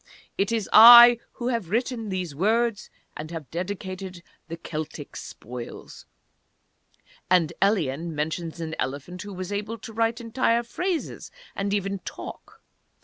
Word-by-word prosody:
"It 200 +3 0
is 225 -3 -1
I 240 +1 +10
who 240 0 -3
have 230 -8 -2
written 230 0 -2
these 185 -5 -3
words, 220 +6 0 0.3
and 155 +1 -7
have 165 -4 -8
dedicated 185 0 -6 0.2
the 165 - -7
Celtic 155 -2 -7
Spoils" 120 +1 -9 1.2
And 175 -4 +3
Elien 170 -5 0
mentions 160 +2 -4
an 160 -1 -5
elephant 145 +7 -4
who 205 0 -8
was 185 +1 -6
able 210 +3 -4
to 225 - -10
write 225 +1 0
entire 235 0 0
phrases, 350 +8 -4 0.3
and 200 0 -2
even 200 -1 -2
talk. - - -10
195 Hz, 135 wpm, -25 LUFS, 165-230 Hz, 1.2 s, I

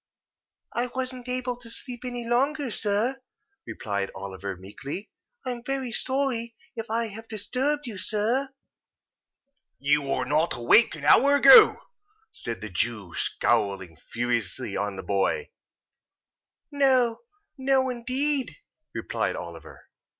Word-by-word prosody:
"I 240 +1 0
wasn't 255 0 -5
able 250 -1 -2
to 240 -1 -12
sleep 245 +1 -6
any 245 -1 -4
longer, 270 +2 +1
sir," 220 +6 0 0.5
replied 100 -3 -3
Oliver, 95 0 -6
meekly. 135 - -7 0.3
"I 255 - -1
am 240 -1 -6
very 265 -1 -3
sorry 255 -3 -1 0.2
if 225 -1 -5
I 230 0 0
have 225 +2 -10
disturbed 265 +7 -1
you, 215 -6 -6
sir." 225 +8 0 1.3
"You 145 +2 +2
were 135 -2 -1
not 155 +5 +1
awake 120 - +5
an 150 -2 -7
hour 280 - +6
ago?" 435 +9 +8 0.5
said 115 -1 -6
the 110 - -5
Jew, 100 -2 -2
scowling 95 -4 0
fiercely 115 +4 -2
on 100 -1 -2
the 95 - -6
boy. 100 - 0 1.2
"No! 260 -5 +3 0.4
No, 265 0 +2
indeed!" 260 +3 -1 0.4
replied - - -1
Oliver. - - -9
230 Hz, 120 wpm, -26 LUFS, -, 1.3 s, ago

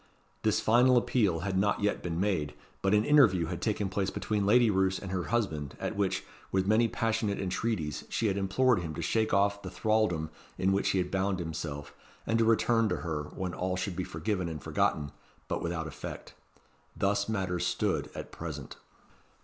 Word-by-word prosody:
This - - +2
final 125 +3 +5
appeal 105 -9 +2
had 95 +1 0
not 105 +1 +1
yet 105 0 0
been 85 -1 -3
made; 85 -7 0 0.3
but 95 +2 +3
an 105 +1 +3
interview 115 - +5
had 85 +1 -5
taken 105 -2 0
place 95 0 -1
between 105 -1 -1
Lady 120 +1 +5
Roos 95 -1 +2
and 95 - -7
her 90 -2 -1
husband, 80 - -2
at - - -3
which, 100 -2 0 0.3
with 95 -1 +1
many 110 +3 +4
passionate 110 -2 -1
entreaties, 95 -5 -2
she 115 - -1
had 100 -3 +2
implored 105 +5 +2
him 80 -3 -5
to - - -4
shake 110 -1 +1
off 100 0 +2
the - - -6
thraldom 110 -8 0 0.3
in 95 +1 +2
which 100 +1 +1
he - - +1
had 90 -1 -1
bound 95 0 0
himself, 80 -4 -5 0.3
and 115 0 +1
to 115 - +4
return 115 +1 +3
to - - 0
her, 75 -2 -2
when 90 +3 -5
all 90 +1 -1
should 90 0 -3
be 95 - -2
forgiven 90 +2 -2
and 75 -4 -6
forgotten, 75 -2 0 0.4
but - - -2
without 85 -1 -2
effect. 80 - -8 0.6
Thus 100 +1 +1
matters 90 -4 -1
stood 90 -4 0
at - - -7
present. 75 -5 -7
95 Hz, 190 wpm, -30 LUFS, 85-110 Hz, 0.6 s, final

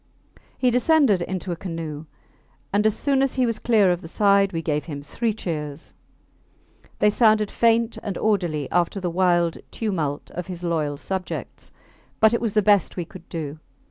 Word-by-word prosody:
He 250 -1 +2
descended 250 - +3
into 185 +1 -3
a - - -1
canoe, 165 -4 -6 0.7
and 210 +2 +3
as 215 - 0
soon 275 -2 +1
as 270 -1 +1
he 255 -1 +2
was 230 -2 -2
clear 215 -6 +3
of 175 0 -1
the - - -9
side 200 +1 +3
we 165 -2 -3
gave 150 -2 -1
him 145 -3 -6
three 230 +10 -1
cheers. 155 -7 -5 1.0
They 210 - +4
sounded 215 -2 +3
faint 230 0 +2
and 200 -4 -4
orderly 175 -9 0
after 175 +3 +1
the 180 -2 -2
wild 175 -2 +2
tumult 165 -10 -3
of 180 0 -6
his 180 -1 -6
loyal 155 -4 -1
subjects, 190 +4 -5 0.5
but 220 +1 +5
it 235 - +1
was 225 -4 -1
the 210 - +3
best 205 -2 +3
we 175 - -2
could 175 0 -14
do. 155 -2 -5
185 Hz, 175 wpm, -23 LUFS, 165-215 Hz, 1.0 s, but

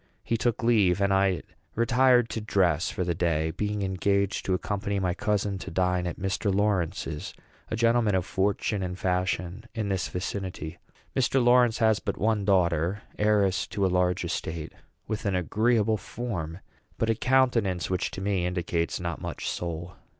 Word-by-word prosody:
He 115 - 0
took 115 0 0
leave, 105 -6 +4
and 100 -1 +2
I 95 -3 +2 0.3
retired 120 +1 +4
to 110 - -3
dress 90 -6 +2
for 90 - -2
the 85 -1 0
day, 80 -1 0
being 105 +3 -2
engaged 100 +1 0
to 95 - +2
accompany 100 +1 -2
my 90 -2 0
cousin 105 -3 -1
to 95 - -7
dine 90 0 0
at 85 - -4
Mr. 95 +2 -1
Lawrence's 95 -6 -1 0.3
a - - -1
gentleman 115 -2 +3
of 90 -2 0
fortune 100 +1 0
and 90 -1 -3
fashion 90 +2 -1
in 110 -3 -2
this 95 -2 0
vicinity. 90 -3 -5 0.4
Mr. 130 +1 +2
Lawrence 120 -1 +5
has 110 -2 +3
but - - -3
one 105 -1 +1
daughter, 90 0 +2 0.2
heiress 105 -3 +2
to 100 -2 -1
a 95 - +1
large 90 -1 +1
estate, 80 -1 -4 0.3
with 105 -1 -3
an 100 - +1
agreeable 110 +4 +2
form, 95 -6 -5 0.4
but 115 0 +1
a - - +3
countenance 115 -8 +2
which, 90 - 0
to 95 - -7
me, 95 -3 0
indicates 85 -2 -1
not 85 -2 -4
much - - -5
soul. 85 0 -4
95 Hz, 165 wpm, -27 LUFS, 90-110 Hz, 0.4 s, Lawrence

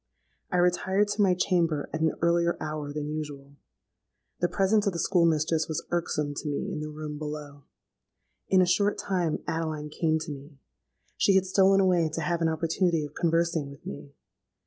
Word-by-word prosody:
I 180 - +1
retired 190 +3 +2
to 205 +1 0
my 190 -3 +4
chamber 170 -5 +1
at 160 - -2
an 160 -1 +2
earlier 170 0 +2
hour 155 -2 -4
than 150 0 -4
usual: 145 -2 -6 0.9
the 175 - +1
presence 205 +2 +2
of 200 - +1
the 170 - -4
school 175 -2 +3
mistress 155 0 +1
was 160 - -3
irksome 150 -4 -1
to - - -4
me 145 - -3
in - - -4
the 155 0 -5
room 150 -1 -6
below. 150 -2 -7 0.8
In 185 -1 +5
a - - +3
short 200 +3 +2
time 180 -5 -1
Adeline 155 -2 -3
came 160 +1 +1
to 155 -1 -5
me. 140 +1 -10 0.6
She 195 - +4
had 190 -1 +4
stolen 195 +1 +4
away 175 -4 +3
to 165 - -2
have 170 +2 -1
an 165 - +3
opportunity 165 0 0
of 145 - -11
conversing 165 -3 0
with 140 -1 -14
me. 70 0 -8
160 Hz, 185 wpm, -27 LUFS, 150-180 Hz, 0.9 s, In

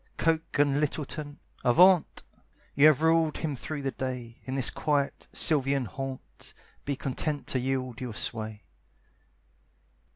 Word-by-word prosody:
Coke 165 -2 0
and 145 -1 +3
Littleton, 150 0 -3 0.3
avaunt! 180 +7 +4 0.5
You 140 +2 +6
have 155 0 +4
ruled 160 -1 +3
him 150 -4 -3
through 145 +3 -6
the 135 - -1
day; 125 -3 -6
In 130 - -4
this 135 -2 +3
quiet, 145 -2 -1
sylvan 140 -4 +3
haunt, 130 +5 -8 0.3
Be 140 - -1
content 145 +2 -3
to 130 - 0
yield 130 -2 -3
your 120 -4 -5
sway. 110 -2 -4
140 Hz, 130 wpm, -28 LUFS, 130-155 Hz, 0.5 s, You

